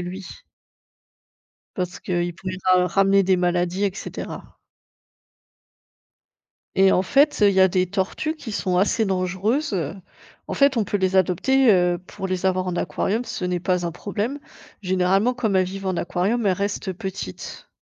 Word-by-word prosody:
lui 180 +2 -6 1.5
parce 180 -2 -4
qu'il 175 -1 -2
pourrait 185 +1 -6 0.2
ra 180 0 +4
ramener 195 +2 +3
des 190 0 +3
maladies 180 +2 0
et 195 -2 +1
cetera. - - -8 2.2
Et 190 0 +6
en - - +3
fait, 280 +10 +3
heu, 205 - +7
il - - 0
y 190 - +5
a 190 - +7
des 185 +1 +1
tortues 200 - -2
qui 265 -7 -8
sont 185 -3 -1
assez 210 +4 +2
dangereuses. 190 - -1 0.5
En - - -4
fait, 280 -1 +3
on 225 - +2
peut 205 - -1
les 190 -1 0
adopter, 225 +8 +3
heu, 180 -1 +2
pour 190 - -6
les 185 0 -2
avoir 185 -1 +1
en 180 - -2
aquarium, 220 +5 -1
ce 185 - -5
n'est 180 -1 -1
pas 180 0 0
un 170 - -2
problème. 220 +9 -3 0.4
Généralement 190 +5 +2
comme 225 -6 -1
elles 185 - +3
vivent 195 +1 -7
en 185 - 0
aquarium, 205 +7 -1
elles 195 - +4
restent 200 +1 -3
petites. 190 - -7
190 Hz, 165 wpm, -23 LUFS, 180-205 Hz, 2.2 s, heu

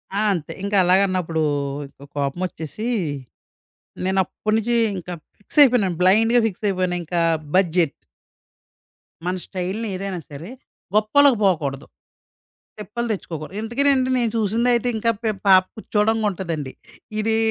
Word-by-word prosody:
ఆ! - - +1
అంతే. 165 -5 -5
ఇంక 200 +1 -3
అలాగన్నప్పుడు 180 -3 +2 0.7
కోపమొచ్చేసి, 160 - -3 1.2
నేనప్పుడి 190 +3 0
నుంచి 235 +2 0 0.2
ఇంక 180 0 -8 0.3
ఫిక్సయిపోయినాను. 235 - +4
బ్లైండ్‌గా 225 +6 +5
ఫిక్స్ 210 +1 -8
అయిపోయాను. 185 -2 -1
ఇంక 175 +2 -6 0.4
బడ్జెట్. 175 -4 +2 1.3
మన 180 +1 0
స్టైల్‌ని 190 +4 -3
ఏదైనా 190 -1 -4
సరే, 155 +8 -8 0.5
గొప్పలకు 245 +4 +4
పోకూడదు. 145 -8 0 0.9
తిప్పలు 210 +4 -4
తెచ్చుకోకూడదు. 170 -1 -6
ఇంతకినండి 260 +3 +1
నేను 235 -2 +1
చూసిందయితే 235 +3 +1
ఇంకా 230 +1 +1
పే 220 - +1 0.2
పాప 185 -1 +8
కుర్చోడంకుంటదండి. 205 -10 -1 0.5
ఇది 220 +1 +1
195 Hz, 105 wpm, -22 LUFS, 180-225 Hz, 1.3 s, పాప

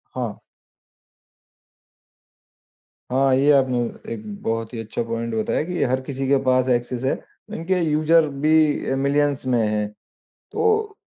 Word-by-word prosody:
हाँ। 120 -5 -4 2.7
हाँ, 135 +1 +3
ये 140 +3 +4
आपने 130 -3 +3 0.3
एक 110 - -7 0.2
बहुत 115 +1 -2
ही 115 - -5
अच्छा 110 -1 -4
पॉइंट 115 0 -4
बताया 110 +6 0
कि 175 +2 -3
हर 130 +1 0
किसी 135 0 -4
के 140 +1 +4
पास 130 -1 +2
एक्सेस 120 0 -1
है। 130 - +1 0.4
इनके 180 +3 -1
यूज़र 155 0 +3 0.2
भी 155 -1 +3
अ, - - +1
मिलियंस 140 +1 +1
में 125 -2 +2
हैं। 105 0 -1 0.7
तो 435 -1 +1
135 Hz, 135 wpm, -22 LUFS, 120-150 Hz, 2.7 s, ये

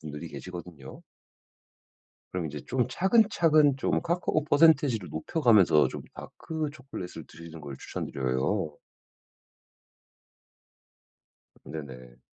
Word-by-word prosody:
분들이 75 -1 -7
계시거든요. 85 -7 -9 1.3
그럼 90 -2 -3
이제 75 -1 -6
좀 125 -2 0
차근차근 170 - +4
좀 - - 0
카카오 170 -3 0
퍼센티지를 145 - +4
높여 120 - -4
가면서 100 - +5
좀 - - -7
다크 160 -2 -5
초콜릿을 95 - -8
드시는 80 0 -11
걸 70 -2 -7
추천 - - -5
드려요. 70 +7 -1 2.9
네네. 65 -5 -9
90 Hz, 240 characters per minute, -28 LUFS, -, 2.9 s, 가면서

